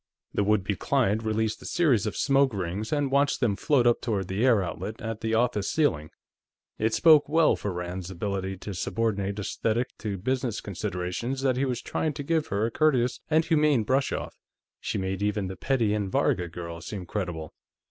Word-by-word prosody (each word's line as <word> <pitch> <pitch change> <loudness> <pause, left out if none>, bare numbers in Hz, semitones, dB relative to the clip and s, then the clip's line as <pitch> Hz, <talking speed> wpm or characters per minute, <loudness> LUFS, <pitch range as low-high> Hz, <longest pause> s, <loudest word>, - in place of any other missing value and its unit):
The 100 - +1
would 105 -1 +2
be 100 +1 -1
client 115 -3 +1
released 110 0 -1
a - - -11
series 130 - +2
of 105 - -4
smoke 135 -4 +3
rings 95 +3 -3
and 145 -3 0
watched 140 +1 +2
them 110 -6 +1
float 130 +2 +2
up 120 -1 +3
toward 100 -6 -2
the 100 +5 -1
air 115 -6 +4
outlet 105 +5 -5
at 115 -1 -5
the 110 0 0
office 115 -4 +1
ceiling. 80 - +1 0.7
It 110 +1 +1
spoke 155 -4 +6
well 160 0 +4
for 100 - -4
Rand's 90 +1 -5
ability 95 +1 -3
to 100 +2 -6
subordinate 100 +1 -1
esthetic 115 +4 -1
to 105 -3 -3
business 125 +2 -1
considerations 95 +7 -3
that 130 -2 +2
he 135 +2 +1
was 125 -3 -3
trying 155 -1 -1
to 145 0 -5
give 160 +1 0
her 100 +2 0
a 115 - -2
courteous 130 -4 +2
and 160 +1 +3
humane 150 -7 +3
brush 135 +5 +1
off. - - -4 0.5
She - - -3
made 95 0 -2
even 105 -1 0
the 95 - -6
Petty 120 -5 +1
and 100 -3 -2
Varga 90 -1 +1
girls 85 0 -7
seem 95 -4 -5
credible. 85 -5 -4
110 Hz, 195 wpm, -27 LUFS, 95-130 Hz, 0.7 s, spoke